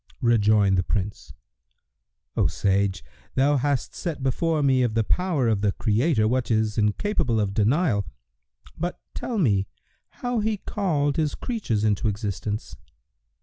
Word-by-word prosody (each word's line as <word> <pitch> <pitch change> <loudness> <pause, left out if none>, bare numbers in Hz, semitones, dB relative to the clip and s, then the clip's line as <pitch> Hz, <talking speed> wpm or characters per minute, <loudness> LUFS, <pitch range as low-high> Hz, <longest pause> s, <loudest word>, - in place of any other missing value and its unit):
Rejoined 105 -4 +4
the - - +2
Prince, 100 +2 -3 1.0
"O - - +3
sage, 95 -1 0 0.3
thou 140 +2 +3
hast 140 -1 -1
set 155 -6 -4
before 155 +3 +1
me 130 -2 +3
of 120 -3 0
the 115 - +3
power 165 - +1
of 110 -3 +1
the 105 -2 +1
Creator 110 +2 +2
what 125 +2 0
is 110 -2 +1
incapable 115 - +1
of 100 -2 0
denial; 110 - +2 0.7
but 175 +2 -4
tell 240 - -3
me 100 - +2 0.6
how 245 -1 +1
He 215 0 0
called 155 -9 -1
His 155 -2 0
creatures 195 - -2
into 105 0 +1
existence." 105 +1 -3
115 Hz, 140 wpm, -25 LUFS, 105-155 Hz, 1.0 s, Rejoined